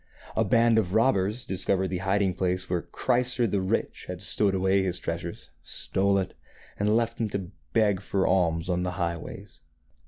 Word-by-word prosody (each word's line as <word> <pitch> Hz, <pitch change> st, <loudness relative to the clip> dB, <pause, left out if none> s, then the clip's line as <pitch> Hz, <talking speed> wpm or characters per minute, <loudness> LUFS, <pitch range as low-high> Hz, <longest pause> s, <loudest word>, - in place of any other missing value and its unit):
A -, -, +3 dB
band 115 Hz, -1 st, +4 dB
of 95 Hz, -2 st, -1 dB
robbers 110 Hz, -1 st, +2 dB
discovered 95 Hz, 0 st, 0 dB
the 90 Hz, -1 st, -2 dB
hiding 95 Hz, 0 st, +1 dB
place 90 Hz, 0 st, -1 dB
where 90 Hz, -1 st, 0 dB
Chrysor 125 Hz, +2 st, +1 dB
the 100 Hz, -2 st, 0 dB
Rich 95 Hz, -, -1 dB
had 90 Hz, -1 st, -5 dB
stowed 100 Hz, +1 st, 0 dB
away 95 Hz, +1 st, +3 dB
his 90 Hz, -1 st, -1 dB
treasures, -, -, -5 dB
stole 100 Hz, +1 st, 0 dB
it, 95 Hz, -1 st, -2 dB, 0.5 s
and 105 Hz, +2 st, +3 dB
left 115 Hz, 0 st, -1 dB
him 110 Hz, -, 0 dB
to 95 Hz, -3 st, -4 dB, 0.2 s
beg 105 Hz, -4 st, +3 dB
for 100 Hz, -1 st, 0 dB
alms 85 Hz, -3 st, +2 dB
on 90 Hz, -1 st, 0 dB
the 90 Hz, 0 st, -2 dB
highways. 85 Hz, -2 st, -5 dB
95 Hz, 175 wpm, -27 LUFS, 90-105 Hz, 0.5 s, band